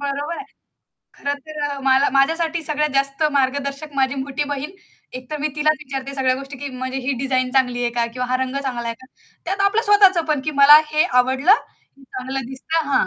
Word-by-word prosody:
बरोबर 285 +3 -3
आहे. 420 - -7 0.7
खरं 285 0 -2
तर 310 0 -9
अ, 280 - -5
मला 265 +1 +4
माझ्यासाठी 325 +4 +1
सगळ्यात 300 -1 -1
जास्त 275 +2 0
मार्गदर्शक 280 +2 -1
माझी 265 0 +2
मोठी 280 +2 -3
बहीण. 285 +3 -4 0.5
एकतर 255 +4 -7
मी 305 - 0
तिलाच 305 +1 +2
विचारते 275 -1 -6
सगळ्या 260 -2 +1
गोष्टी, 275 +1 -8
की 285 +2 -5
म्हणजे 260 +1 -3
ही 275 - 0
डिझाइन 255 -1 0
चांगली 250 -2 +2
आहे 240 - 0
का? 235 -1 0
किंवा 250 0 -3
हा 255 - +1
रंग 260 +1 -4
चांगला 245 -3 -3
आहे 230 - -3
का? 260 - -15 0.4
त्यात 390 +3 -3
आपलं 440 +3 0
स्वतःचं 385 -5 +5
पण, 295 - -1
की 310 - -1
मला 295 +2 +10
हे 305 +3 +3 0.2
आवडलं, 265 +8 +3 0.5
चांगलं 260 +1 -5
दिसतं. 320 +5 -2
हां. 280 - +2
275 Hz, 200 wpm, -21 LUFS, 260-305 Hz, 0.7 s, मला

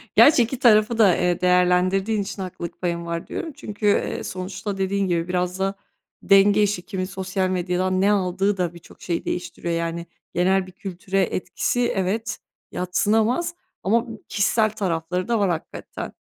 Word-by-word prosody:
Gerçi, 285 -4 +7
2 240 +2 -4
tarafı 220 -2 +4
da, 205 -6 +5
eee, 180 -1 0
değerlendirdiğin 180 +3 +3
için 195 0 -5
haklılık 180 -2 -7
payın 170 -1 -2
var, 170 0 -4
diyorum. 320 -3 -5
Çünkü, 210 -6 -7
eee, 205 - +1
sonuçta 190 +2 -5
dediğin 195 0 0
gibi 170 -1 0
biraz 180 0 -1
da 195 +1 0 0.5
denge 200 +1 +5
işi. 200 -3 0
Kimin 190 -3 -3
sosyal 190 0 -2
medyadan 185 +1 0
ne 200 - +4
aldığı 195 0 +1
da 175 -2 -1
birçok 170 - -16
şeyi 170 -2 -3
değiştiriyor. 175 -1 -3
Yani, 170 0 -2 0.3
genel 185 +2 +2
bir - - -11
kültüre 190 +1 -3
etkisi, 240 +6 -1
evet, 195 +4 -1 0.3
yadsınamaz 220 - +1 0.3
ama 230 +5 +2
b - - -7 0.2
kişisel 215 +1 +2
tarafları 180 -3 -2
da 235 -2 +1
var, 200 -2 +2
hakikaten. 165 -2 -5
190 Hz, 160 wpm, -23 LUFS, 180-210 Hz, 0.5 s, Gerçi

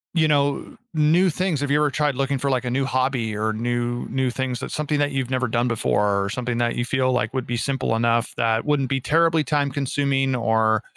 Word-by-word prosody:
You 160 -2 +3
know, 145 -2 0 0.2
new 160 +4 +3
things, 180 -4 -1
have 145 -1 -1
you 145 - +4
ever 150 -1 +3
tried 150 0 0
looking 135 +1 -1
for, 140 +1 -1
like, 130 -1 0
a - - -1
new 135 +2 0
hobby, 130 -5 -1
or 110 +1 -1
new 120 +2 -2
new 130 -1 0
things 125 -1 -3
that's - - -5
something 150 -1 -1
that 145 0 +1
you've 130 -2 -2
never 130 0 0
done 120 +1 0
before, 105 -3 +1
or 100 - -3
something 120 +1 -3
that 120 0 0
you 120 - -1
feel 130 0 +1
like 125 0 -1
would 130 -2 -3
be 120 - -2
simple 130 -1 -1
enough, 115 +1 +1
that 115 -1 +1
wouldn't 145 -3 0
be 135 -1 0
terribly 165 +2 +2
time-consuming 140 -1 0
or, 110 -1 +1
130 Hz, 225 wpm, -23 LUFS, 120-145 Hz, 0.2 s, you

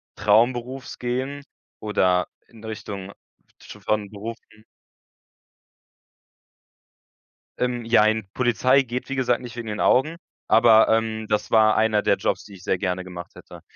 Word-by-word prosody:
Traumberufs 120 +5 0
gehen 130 +4 -3 0.4
oder 90 -4 +1 0.2
in 115 -2 -17
Richtung 100 -3 -7
f - - -20 0.5
sch - - -12
von 105 -2 -1
Berufen 110 0 -10 3.0
Ähm, 125 -1 -2
jein, 110 -2 +3
Polizei 130 +2 +2
geht, 125 +1 -5
wie 135 - -3
gesagt, 125 -2 0
nicht 120 -2 -9
wegen 120 -2 -6
den 105 -1 -4
Augen. 155 +6 +2 0.3
Aber, 110 -1 +6
ähm, 110 -1 0
das 105 -1 -1
war 110 -1 +5
einer 110 -1 +2
der - - +3
Jobs, - - -2
die 105 - -14
ich 95 -2 -14
sehr 95 - 0
gerne 90 0 -2
gemacht 90 -1 -9
hätte. - - -13
110 Hz, 140 wpm, -23 LUFS, 105-125 Hz, 3.0 s, Aber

